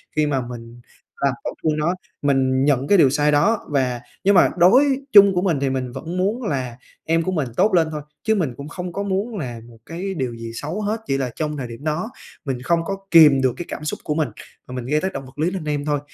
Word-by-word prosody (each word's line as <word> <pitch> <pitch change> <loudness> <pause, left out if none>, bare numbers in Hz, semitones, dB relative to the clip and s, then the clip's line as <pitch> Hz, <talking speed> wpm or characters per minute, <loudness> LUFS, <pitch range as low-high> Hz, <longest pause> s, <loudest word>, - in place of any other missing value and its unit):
khi 155 -1 +2
mà 135 -3 0
mình 120 0 -10 0.4
làm 135 - +2
tổn - - -4
thương 155 -1 +1
nó. 155 +4 +1 0.3
Mình 135 -1 +2
nhận 140 -1 +2
cái 200 - +5
điều 145 -7 +6
sai 145 +2 +2
đó 200 +10 +3
và 130 -4 0 0.2
nhưng 200 +1 +4
mà 175 - +6
đối 260 +10 +5
chung 200 -2 +8
của 180 - +2
mình 170 -7 +1
thì 140 - +1
mình 130 -2 -3
vẫn 160 +8 -6
muốn 210 +7 0
là 130 - -3 0.3
em 165 +1 +1
của 185 - -2
mình 155 -7 -1
tốt 215 - +3
lên 165 -3 +4
thôi, 150 -1 -4 0.2
chứ 220 0 +2
mình 155 - -1
cũng 140 - -7
không 180 0 -6
có 200 - -2
muốn 200 +3 -2
là 120 -7 -5
một 115 -1 -16
cái 185 +4 -5
điều 130 -8 -3
gì 115 0 -7
xấu 155 - -4
hết, 215 +2 -1
chỉ 135 - +1
là 130 -3 -2
trong 150 -1 -3
thời 130 -3 -4
điểm 115 +4 -10
đó 160 +8 -2 0.4
mình 130 -3 -3
không 170 +6 +1
có 195 +3 -3
kiềm 150 -5 +7
được 130 -2 +2
cái 175 - -5
cảm - - -6
xúc 150 - -3
của 150 - -2
mình, 155 -5 0 0.4
mà 125 - -7
mình 125 -2 -5
gây 150 +4 +1
tác 190 0 -2
động 135 0 -6
vật 130 +2 -15
lý 165 +4 +1
lên 190 -3 -4
em 145 -1 -2
thôi. 145 -1 0
150 Hz, 260 wpm, -21 LUFS, 130-180 Hz, 0.4 s, chung